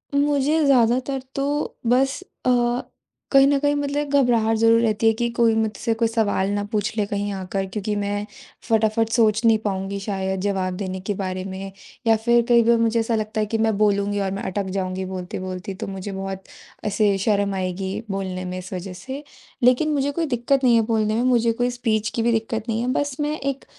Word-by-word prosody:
मुझे 290 Hz, +2 st, +2 dB
ज़्यादातर 255 Hz, +1 st, +2 dB
तो 275 Hz, -, 0 dB, 0.4 s
बस 265 Hz, +7 st, +2 dB, 0.2 s
अ, -, -, +3 dB, 0.8 s
कहीं 275 Hz, 0 st, +7 dB
न 285 Hz, 0 st, +3 dB
कहीं 290 Hz, 0 st, +1 dB
मतलब 285 Hz, 0 st, -2 dB
एक 290 Hz, -1 st, -1 dB
घबराहट 230 Hz, -4 st, +3 dB
ज़रूर 230 Hz, +1 st, +4 dB
रहती 225 Hz, -1 st, +1 dB
है 225 Hz, -, +5 dB
कि 240 Hz, 0 st, +1 dB
कोई 230 Hz, -1 st, +4 dB
मुझसे 220 Hz, +1 st, 0 dB
कोई 230 Hz, -, +3 dB
सवाल 210 Hz, -4 st, 0 dB
ना 205 Hz, -, -1 dB
पूछ 215 Hz, +1 st, -1 dB
ले 210 Hz, -, +2 dB
कहीं 205 Hz, 0 st, -2 dB
आकर, 190 Hz, 0 st, -3 dB
क्योंकि 210 Hz, +2 st, -3 dB
मैं 205 Hz, 0 st, -2 dB, 0.4 s
फटाफट 220 Hz, 0 st, +2 dB
सोच 220 Hz, -2 st, +3 dB
नहीं 225 Hz, -1 st, +6 dB
पाऊँगी 195 Hz, -1 st, -3 dB
शायद 190 Hz, -1 st, -2 dB
जवाब 190 Hz, -2 st, -1 dB
देने 190 Hz, -2 st, -4 dB
के -, -, +2 dB
बारे 185 Hz, 0 st, -3 dB
में। 195 Hz, 0 st, -6 dB, 0.4 s
या 225 Hz, -, +6 dB
फ़िर 235 Hz, +2 st, +3 dB
कई 235 Hz, -1 st, +6 dB
बार 235 Hz, +1 st, +4 dB
मुझे 230 Hz, 0 st, +2 dB
ऐसा 225 Hz, 0 st, 0 dB
लगता 215 Hz, 0 st, -2 dB
है 215 Hz, -, +1 dB
कि -, -, +3 dB
मैं 220 Hz, -2 st, +1 dB
बोलूँगी 205 Hz, -1 st, +1 dB
और 195 Hz, -1 st, -1 dB
मैं 195 Hz, -, -4 dB
अटक 195 Hz, +1 st, -2 dB
जाऊँगी 185 Hz, 0 st, -2 dB
बोलते-बोलते, 185 Hz, +1 st, -5 dB
तो 220 Hz, +2 st, -6 dB
मुझे 195 Hz, +1 st, -5 dB
बहुत 195 Hz, 0 st, -5 dB, 0.4 s
ऐसे 205 Hz, -1 st, +2 dB
शर्म 200 Hz, -1 st, +1 dB
आएगी 190 Hz, 0 st, -3 dB, 0.2 s
बोलने 185 Hz, -1 st, -3 dB
में 180 Hz, 0 st, -4 dB
इस 185 Hz, +1 st, -8 dB
वज़ह 185 Hz, +1 st, -5 dB
से। 265 Hz, +10 st, -7 dB, 0.4 s
लेकिन 255 Hz, +6 st, +4 dB
मुझे 285 Hz, 0 st, 0 dB
कोई 330 Hz, +3 st, -1 dB
दिक्कत 265 Hz, 0 st, 0 dB
नहीं 245 Hz, -2 st, +5 dB
है 230 Hz, -, +5 dB
बोलने 220 Hz, -1 st, +1 dB
में, 235 Hz, -, +1 dB
मुझे 235 Hz, -2 st, +3 dB
कोई 245 Hz, +2 st, 0 dB
स्पीच 220 Hz, -3 st, -1 dB
की 230 Hz, -, 0 dB
भी 235 Hz, -, +3 dB
दिक्कत 225 Hz, 0 st, -1 dB
नहीं 225 Hz, +1 st, 0 dB
है। 245 Hz, -, -2 dB
बस 285 Hz, -2 st, -1 dB
मैं 295 Hz, +1 st, 0 dB
एक 275 Hz, 0 st, -3 dB
220 Hz, 205 wpm, -22 LUFS, 195-240 Hz, 0.8 s, कहीं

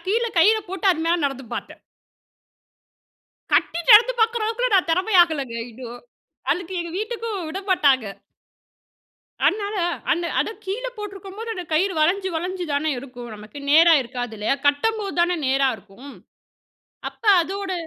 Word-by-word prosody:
கீழே 455 Hz, +3 st, 0 dB
கயிற 420 Hz, +7 st, +6 dB
போட்டு 380 Hz, +1 st, -3 dB
அது 320 Hz, -, -5 dB
மேல 345 Hz, +1 st, +2 dB
நடந்து 270 Hz, -2 st, -3 dB
பார்த்தேன். -, -, -7 dB, 1.7 s
கட்டி 340 Hz, -, +2 dB
நடந்து 460 Hz, +4 st, +8 dB
பார்க்குற 450 Hz, 0 st, +2 dB
அளவுக்குலாம் 460 Hz, 0 st, 0 dB
நான் 360 Hz, -, +1 dB
தெறமையாகலங்க 330 Hz, -, +2 dB
இன்னும். 240 Hz, 0 st, -10 dB, 0.5 s
அதுக்கு 365 Hz, +1 st, -5 dB
எங்க 340 Hz, -1 st, -5 dB
வீட்டுக்கும் 450 Hz, -1 st, -4 dB
விட 370 Hz, +5 st, -5 dB
மாட்டாங்க. 280 Hz, -9 st, +3 dB, 1.4 s
அதனால 410 Hz, 0 st, +1 dB, 0.4 s
அந்த 345 Hz, +2 st, -1 dB
அத -, -, -1 dB, 0.2 s
கீழ 415 Hz, +6 st, -4 dB
போட்ருக்கும்போது, 405 Hz, +1 st, -8 dB
அந்த 360 Hz, -, -6 dB
கயிறு 370 Hz, +4 st, +1 dB
வளைஞ்சி, 380 Hz, +5 st, +2 dB
வளைஞ்சி 360 Hz, +2 st, -3 dB
தானே 300 Hz, +2 st, 0 dB
இருக்கும். 245 Hz, -3 st, -9 dB
நமக்கு 210 Hz, +7 st, -11 dB
நேரா 330 Hz, +2 st, +7 dB
இருக்காது 245 Hz, -1 st, -6 dB
இல்லையா? 215 Hz, +6 st, +1 dB
கட்டம்போது 400 Hz, +8 st, 0 dB
தானே 350 Hz, +1 st, +2 dB
நேரா 270 Hz, +1 st, +2 dB
இருக்கும். 245 Hz, +8 st, -14 dB, 0.9 s
அப்ப -, -, -20 dB, 0.2 s
அதோட 390 Hz, +2 st, -4 dB
350 Hz, 135 wpm, -22 LUFS, 280-405 Hz, 1.7 s, நடந்து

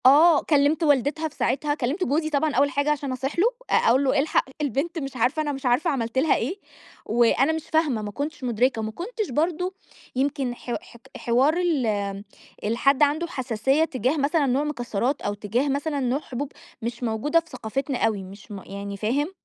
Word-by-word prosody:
آه، 300 Hz, +4 st, +7 dB
كلّمت 295 Hz, +1 st, +3 dB
والدتها 295 Hz, +2 st, +2 dB
في 310 Hz, -, -14 dB
ساعتها، 290 Hz, +4 st, 0 dB
كلّمت 295 Hz, +7 st, -1 dB
جوزي 310 Hz, +3 st, 0 dB
طبعًا 300 Hz, 0 st, +1 dB
أول 280 Hz, +2 st, +4 dB
حاجة 285 Hz, +2 st, +1 dB
عشان 285 Hz, -2 st, -2 dB
أصيح 270 Hz, +5 st, -3 dB
له، 375 Hz, -, +5 dB, 0.2 s
أ -, -, -1 dB
أقول 255 Hz, +4 st, +4 dB
له: 270 Hz, 0 st, +2 dB
"إلحق 300 Hz, +3 st, +2 dB, 0.2 s
البنت 300 Hz, +5 st, -1 dB
مش 275 Hz, -3 st, -6 dB
عارفة، 255 Hz, +6 st, +1 dB
أنا 295 Hz, -1 st, -1 dB
مش 270 Hz, -1 st, -6 dB
عارفة 250 Hz, +8 st, +2 dB
عملت 235 Hz, -4 st, -2 dB
لها 305 Hz, +4 st, +4 dB
إيه." 370 Hz, -, -2 dB, 0.5 s
وأنا 240 Hz, +5 st, +3 dB
مش 320 Hz, -1 st, -3 dB
فاهمة، 300 Hz, -8 st, +2 dB
ما 210 Hz, -1 st, -5 dB
كُنتش 290 Hz, +4 st, -5 dB
مُدركة. 245 Hz, 0 st, +1 dB
ما 220 Hz, 0 st, -3 dB
كُنتش 430 Hz, -, -4 dB
برضه، 340 Hz, +7 st, 0 dB, 0.4 s
يمكن 270 Hz, -2 st, 0 dB
ح 245 Hz, -, -8 dB
ح -, -, -17 dB, 0.2 s
حوار 255 Hz, +6 st, +3 dB
ال 215 Hz, -, 0 dB, 0.4 s
الحد 260 Hz, +6 st, +3 dB
عنده 305 Hz, +4 st, +2 dB
حساسية 265 Hz, +1 st, +1 dB
تجاه 260 Hz, 0 st, -1 dB
مثلًا 290 Hz, +2 st, +2 dB
نوع 270 Hz, +2 st, +1 dB
مكسّرات 250 Hz, -2 st, -2 dB
أو 205 Hz, -, -1 dB
تجاه 215 Hz, +7 st, -1 dB
مثلًا 285 Hz, +1 st, -1 dB
نوع 260 Hz, +1 st, 0 dB
حبوب 275 Hz, 0 st, -5 dB, 0.3 s
مش 235 Hz, +2 st, -4 dB
موجودة 240 Hz, +8 st, +2 dB
في 335 Hz, 0 st, -14 dB
ثقافتنا 255 Hz, +3 st, -3 dB
أوي، 205 Hz, -3 st, -2 dB
مش 195 Hz, +3 st, -12 dB
م 200 Hz, -2 st, -6 dB
يعني 200 Hz, 0 st, -6 dB
فاهم؟ 270 Hz, -, 0 dB
275 Hz, 190 wpm, -25 LUFS, 240-300 Hz, 0.5 s, آه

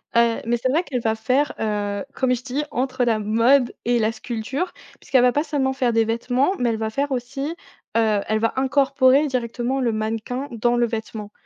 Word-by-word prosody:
heu, 235 Hz, -1 st, +4 dB
mais 240 Hz, +1 st, 0 dB
c'est 255 Hz, +2 st, -1 dB
vrai 315 Hz, +6 st, +2 dB
qu'elle 250 Hz, -7 st, -3 dB
va 220 Hz, -1 st, +1 dB
faire, 255 Hz, +6 st, 0 dB
heu, 205 Hz, -2 st, -2 dB
comme 255 Hz, -1 st, +2 dB
je 245 Hz, -, -2 dB
t'ai 250 Hz, -1 st, -9 dB
dis, 300 Hz, -, +1 dB
entre 255 Hz, 0 st, -1 dB
la 225 Hz, -3 st, +2 dB
mode 235 Hz, +5 st, +3 dB
et 240 Hz, 0 st, +2 dB
la 220 Hz, 0 st, +2 dB
sculpture. 240 Hz, +9 st, -4 dB, 0.3 s
Parce -, -, -19 dB
qu'elle 260 Hz, -2 st, +6 dB
va 250 Hz, 0 st, +5 dB
pas 295 Hz, +4 st, +1 dB
seulement 280 Hz, -4 st, 0 dB
faire 250 Hz, -3 st, 0 dB
des 225 Hz, 0 st, +4 dB
vêtements, 245 Hz, -, 0 dB
mais 245 Hz, -1 st, +1 dB
elle 225 Hz, -, -1 dB
va 220 Hz, 0 st, -1 dB
faire 280 Hz, +5 st, -2 dB
aussi, 275 Hz, +5 st, -3 dB, 0.4 s
heu, 215 Hz, -3 st, +3 dB
elle 215 Hz, 0 st, +1 dB
va 230 Hz, -, 0 dB
incorporer 270 Hz, +1 st, +3 dB
directement 250 Hz, +1 st, -2 dB
le 235 Hz, -2 st, +1 dB
mannequin 225 Hz, +5 st, -3 dB
dans 240 Hz, +1 st, +1 dB
le 240 Hz, 0 st, +3 dB
vêtement 220 Hz, -2 st, -5 dB
245 Hz, 215 wpm, -22 LUFS, 225-265 Hz, 0.4 s, qu'elle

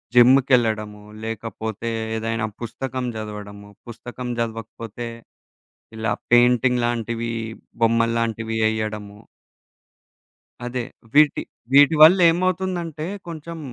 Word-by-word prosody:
జిమ్ముకెళ్ళడము, 120 Hz, -5 st, +4 dB, 0.2 s
లేకపోతే 110 Hz, 0 st, -5 dB, 0.3 s
ఏదైనా 115 Hz, 0 st, -2 dB, 0.2 s
పుస్తకం 130 Hz, +2 st, -4 dB
జదవడము, 105 Hz, -1 st, -8 dB, 0.2 s
పుస్తకం 120 Hz, +2 st, -8 dB
జదవకపోతే 115 Hz, 0 st, -5 dB, 0.9 s
ఇలా 110 Hz, -1 st, -1 dB, 0.2 s
పెయింటింగ్ 125 Hz, 0 st, +4 dB
లాంటివీ, 115 Hz, 0 st, -2 dB, 0.5 s
బొమ్మల్లాంటివి 115 Hz, -1 st, +1 dB
యెయ్యెడము. 110 Hz, -2 st, -2 dB, 1.5 s
అదే. 125 Hz, 0 st, -3 dB, 0.3 s
వీటి, 150 Hz, 0 st, +5 dB, 0.3 s
వీటి 145 Hz, +3 st, +7 dB
వల్లేమవుతుందంటే, 175 Hz, -1 st, +3 dB, 0.2 s
కొంచం 165 Hz, 0 st, -7 dB
115 Hz, 75 wpm, -22 LUFS, 110-135 Hz, 1.5 s, వీటి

